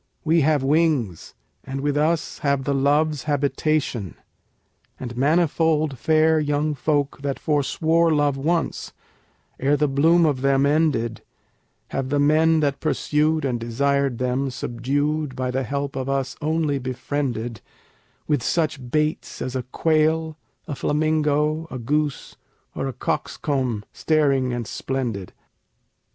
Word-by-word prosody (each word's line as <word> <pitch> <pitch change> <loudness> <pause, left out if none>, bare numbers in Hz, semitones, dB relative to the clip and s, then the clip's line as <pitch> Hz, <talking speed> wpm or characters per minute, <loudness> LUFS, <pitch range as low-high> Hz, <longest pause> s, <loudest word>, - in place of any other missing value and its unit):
We 165 +1 +3
have 150 -1 +2
wings, 140 - 0 0.3
and 135 +1 -5
with 145 0 0
us 155 +2 0
have 140 -2 0
the 140 +1 0
Loves 145 +2 +1
habitation; 145 - -1 0.8
And 120 -2 -6
manifold 155 0 +2
fair 155 +3 +3
young 150 0 0
folk 145 0 -1
that 140 -1 -2
forswore 160 +3 +1
love 145 -2 +2
once, 165 +5 -1 0.7
ere 140 +2 +2
the 150 - +2
bloom 165 +5 +4
of 140 -4 0
them 135 0 +3
ended, 145 -7 +1 0.7
Have 135 -1 -3
the 145 - +1
men 155 +2 +4
that 140 -2 0
pursued 155 0 +1
and 125 -3 -1
desired 140 +2 0
them 130 +2 -1
subdued 135 +4 -2
by 130 -1 -2
the 130 +1 -1
help 140 +2 -3
of 130 0 -3
us 135 -1 -1
only 155 -2 0
befriended, 125 -2 -3 0.7
With 150 -5 +1
such 140 -3 -1
baits 150 +2 -1
as 130 - -4
a 130 - 0
quail, 160 +4 +1 0.3
a - - -3
flamingo, 155 +1 +1
a 130 - -5
goose, 145 +3 -2 0.4
or - - -3
a 135 - -4
cock's - - -3
comb 125 -7 -1
staring 140 -5 +1
and 120 -1 -3
splendid. 115 -5 -3
145 Hz, 135 wpm, -23 LUFS, 130-155 Hz, 0.8 s, bloom